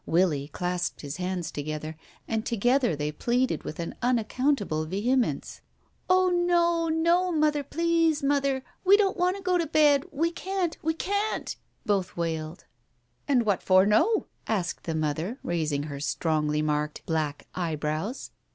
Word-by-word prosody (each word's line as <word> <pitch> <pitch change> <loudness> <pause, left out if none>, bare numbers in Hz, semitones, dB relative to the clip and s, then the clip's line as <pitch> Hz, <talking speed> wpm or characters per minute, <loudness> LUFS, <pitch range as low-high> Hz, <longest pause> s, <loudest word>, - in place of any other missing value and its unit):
Willie 160 -5 +2
clasped 180 +3 -3
his 145 +1 -6
hands 180 -2 -3
to 145 - -4
gether, 155 +1 -5 0.3
and 220 -1 -1
together 240 - +2
they 150 +1 -2
pleaded 245 - 0
with 155 - -7
an 170 - -4
unaccountable 240 - 0
vehemence.... 235 +8 -1 0.5
"Oh, 370 0 +4
no, 345 -1 +2
no, 340 +3 +2
Mother; 305 -2 +2
please, 330 0 +1
Mother 275 -1 +1
— - - -39
we 395 +2 +7
don't 395 -2 +2
want 360 +2 +1
to 395 - -10
go 360 -1 +2
to 335 - 0
bed. 290 -2 +4
We 325 +4 0
can't! 370 -1 -2
We 320 +1 0
can't! 405 +5 -2 0.2
" - - -43
both 195 -4 0
wailed. 160 -1 -3 0.6
"And 255 -5 +3
what 200 -4 +1
for 185 0 +5
no?" 320 - +3 0.2
asked 195 -6 -2
the 165 - -2
mother, 155 - -2
raising 155 -4 -1
her 145 -2 -6
strongly 150 +1 0
marked 150 0 -2
black 155 -3 -2
eyebrows. 160 - -3
225 Hz, 155 wpm, -27 LUFS, -, 0.6 s, we